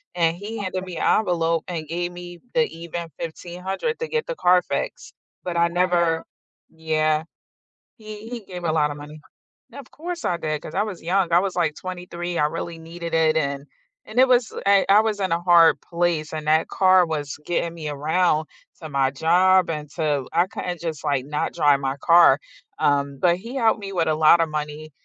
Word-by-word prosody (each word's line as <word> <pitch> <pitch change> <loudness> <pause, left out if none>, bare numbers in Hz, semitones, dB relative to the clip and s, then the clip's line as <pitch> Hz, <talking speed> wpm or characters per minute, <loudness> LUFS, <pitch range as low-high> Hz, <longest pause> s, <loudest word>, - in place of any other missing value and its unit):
and 165 -1 +1
he 215 +4 -6
handed 185 -2 -4
me 180 -2 -7
an - - +3
envelope, 165 -5 0
and 165 -4 -5
gave 175 +1 -2
me 175 0 -10
the 240 -1 +3
even 170 0 -6
1500 180 - -4
to 475 - -3
get 465 -1 -2
the - - -3
car 180 - +4
fixed. - - -5 0.3
But 175 -1 -3
I 170 0 +4
never 170 -2 +1 0.5
yeah, 155 -1 0 0.7
he 215 0 -10
he 245 -1 -5
gave 180 -2 -8
a 165 - +1
lotta 150 -2 +1
money. 150 +1 -10 0.5
Of 275 -3 -11
course, 345 +2 -6
I 175 - 0
did 155 -2 -3
cause 155 - -9
I 200 - +2
was 210 -5 -7
young, 180 0 +1
I 170 - +7
was 190 0 -2
like 165 -4 0
23. 175 -1 -6
I 150 - +3
really 165 +1 -6
needed 165 +1 -8
it 160 -1 +3
and 140 -2 -2 0.4
and 220 +3 -3
it 260 - +7
was 245 -3 +2
I 200 -1 +4
I 205 +2 +7
was 220 -2 -2
in 190 -3 -1
a 170 - -1
hard 170 -2 +5
place, 170 -3 -1
and 155 -1 -5
that 155 +1 +3
car 185 -1 +4
was 150 -4 -4
getting 170 -1 -1
me 155 -3 -5
around 155 +2 +1 0.3
to 155 - -6
my 135 -2 +1
job, 180 +5 +3
and 150 -2 -4
to 145 -5 -1
I 170 +2 +3
couldn't 180 -2 -5
just 160 -4 -5
like, 140 -4 0
not 150 +1 -2
drive 145 -2 +3
my 135 +1 -2
car, 170 0 +6 0.4
um, 140 -1 +1
but 175 -1 +4
he 230 +7 -9
helped 225 -4 +2
me 195 - -6
with 170 -3 0
a 155 - +2
lotta 160 +2 +5
money, 150 0 -5
170 Hz, 200 wpm, -23 LUFS, 155-185 Hz, 0.7 s, I